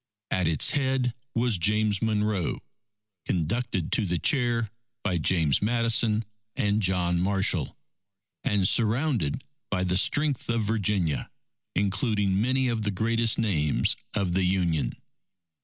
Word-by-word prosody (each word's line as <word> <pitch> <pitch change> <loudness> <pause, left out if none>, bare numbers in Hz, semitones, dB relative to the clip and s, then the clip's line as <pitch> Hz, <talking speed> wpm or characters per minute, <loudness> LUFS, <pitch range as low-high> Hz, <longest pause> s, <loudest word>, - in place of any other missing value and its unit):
At 90 -3 +1
its 80 -3 +4
head 130 -3 0 0.2
was 115 -4 +1
James 105 +2 +1
Monroe, 105 -5 -1 0.6
conducted 95 +2 -1
to 105 - +1
the 90 0 0
chair 120 - +1 0.4
by 90 -4 0
James 80 -3 +2
Madison 115 0 +2 0.3
and 105 +1 +1
John 90 -2 +1
Marshall, 95 -5 0 0.7
and 100 -3 +2
surrounded 115 - +1 0.2
by 90 - -1
the 90 0 +1
strength 145 +3 +1
of 115 -1 +1
Virginia, 100 -7 -1 0.5
including 100 0 +1
many 130 +2 +1
of 115 -2 -1
the 105 - -1
greatest 115 +3 +1
names 85 -10 +1 0.2
of 95 -5 0
the 95 +1 +1
Union. 90 -4 0
105 Hz, 125 wpm, -26 LUFS, 90-115 Hz, 0.7 s, its